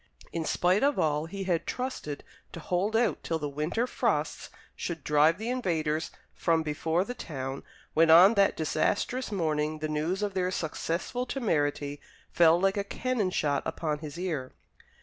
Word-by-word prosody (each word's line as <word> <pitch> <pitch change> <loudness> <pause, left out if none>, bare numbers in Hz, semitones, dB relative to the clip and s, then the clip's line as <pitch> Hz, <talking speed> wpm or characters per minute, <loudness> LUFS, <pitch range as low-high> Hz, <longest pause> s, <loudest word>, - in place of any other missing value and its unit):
In 165 -1 -2
spite 180 +5 +2
of 285 +1 +2
all, 150 0 +1
he 195 +3 -5
had 175 -3 -1
trusted 250 - -4 0.3
to - - -6
hold 185 +6 -1
out 230 -2 +2
till 165 - -2
the 150 -2 -3
winter 150 - -1
frosts - - -1 0.3
should 165 -4 -5
drive 150 +2 +4
the 225 +4 -3
invaders 160 -10 -1 0.2
from 165 -2 +1
before 160 +3 0
the 245 - -5
town, 135 - -5 0.3
when 165 +1 +4
on 180 +6 +9
that 200 -2 +3
disastrous 215 - 0
morning 155 -5 0
the 155 0 -3
news 160 +6 -1
of 205 -1 -1
their 185 -1 0
successful 185 +8 -3
temerity 145 - -1 0.3
fell 170 0 +5
like 195 +2 +2
a 200 - +1
cannon 220 0 -1
shot 145 -6 0
upon 150 -3 -2
his 150 0 -8
ear. 160 -8 -3
165 Hz, 165 wpm, -29 LUFS, 155-200 Hz, 0.3 s, on